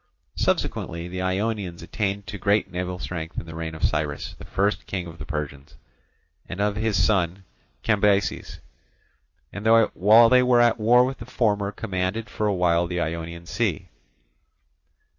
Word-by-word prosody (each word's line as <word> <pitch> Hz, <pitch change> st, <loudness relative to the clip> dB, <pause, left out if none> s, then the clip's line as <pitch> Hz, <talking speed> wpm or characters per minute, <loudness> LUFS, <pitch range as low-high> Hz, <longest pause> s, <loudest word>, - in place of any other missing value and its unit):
Subsequently 85 Hz, +1 st, -1 dB
the 90 Hz, +1 st, -5 dB
Ionians 95 Hz, -1 st, -2 dB
attained 100 Hz, -1 st, -2 dB
to 105 Hz, -, -7 dB
great 100 Hz, 0 st, +1 dB
naval 90 Hz, 0 st, -3 dB
strength 85 Hz, -2 st, -5 dB
in -, -, -9 dB
the 80 Hz, -, -9 dB
reign 80 Hz, 0 st, -5 dB
of 80 Hz, -, -9 dB
Cyrus, 75 Hz, -1 st, -1 dB
the -, -, -10 dB
first 100 Hz, +2 st, -1 dB
king 90 Hz, -3 st, -3 dB
of 85 Hz, -1 st, -11 dB
the 75 Hz, -, -7 dB
Persians, 70 Hz, -2 st, -5 dB, 0.7 s
and 95 Hz, -, -6 dB
of 105 Hz, 0 st, +1 dB
his 110 Hz, -1 st, 0 dB
son 95 Hz, -1 st, +1 dB, 0.4 s
Cambyses, 100 Hz, -2 st, +1 dB, 0.9 s
and 100 Hz, +3 st, -4 dB, 0.3 s
while 110 Hz, +5 st, +6 dB
they 125 Hz, +2 st, +5 dB
were 125 Hz, -1 st, +4 dB
at 120 Hz, -1 st, +4 dB
war 120 Hz, +3 st, +5 dB
with 135 Hz, +1 st, -4 dB
the 115 Hz, -, -9 dB
former 105 Hz, -5 st, 0 dB
commanded 105 Hz, +1 st, -3 dB
for 105 Hz, -, -1 dB
a 100 Hz, -, +1 dB
while 85 Hz, -1 st, +2 dB
the 90 Hz, 0 st, -3 dB
Ionian 85 Hz, +1 st, -4 dB
sea. 95 Hz, -3 st, -2 dB
95 Hz, 160 wpm, -24 LUFS, 85-105 Hz, 0.9 s, while